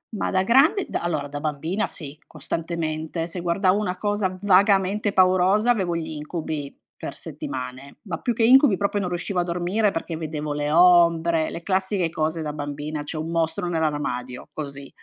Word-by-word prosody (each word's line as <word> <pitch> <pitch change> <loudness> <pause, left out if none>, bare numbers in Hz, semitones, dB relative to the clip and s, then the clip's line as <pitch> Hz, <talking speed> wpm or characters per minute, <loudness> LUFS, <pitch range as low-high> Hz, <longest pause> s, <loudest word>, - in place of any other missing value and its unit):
Ma - - -1
da 185 -1 +2
grande 300 - +4
da - - -2
allora 160 -4 -2
da 145 0 -6
bambina 160 +6 -2
sì, 150 -3 -6
costantemente. 165 -1 -3
Se 175 +1 -6
guardavo 185 +3 +2
una 185 -4 -2
cosa 205 -2 -1
vagamente 200 +1 +3
paurosa 185 +4 +4
avevo 185 -7 0
gli 165 -1 -3
incubi 150 -1 -5 0.2
per - - -7
settimane, 130 +1 -7
ma 180 -6 -5
più 240 - -1
che 230 - 0
incubi 255 -3 +6
proprio 200 +1 0
non 185 - -2
riuscivo 180 +2 -2
a - - +2
dormire 180 +5 0
perché 165 -1 -4
vedevo 155 -2 -4
le 145 0 -2
ombre, 170 -1 +4
le 170 - -7
classiche 190 -2 0
cose 160 +1 -2
da 150 -1 -4
bambina, 145 +1 -5
c'è 145 - -6
un 155 +1 -4
mostro 165 +1 0
nell'armadio, 145 -7 -2
così. 140 -2 -6
170 Hz, 170 wpm, -24 LUFS, 155-190 Hz, 0.2 s, incubi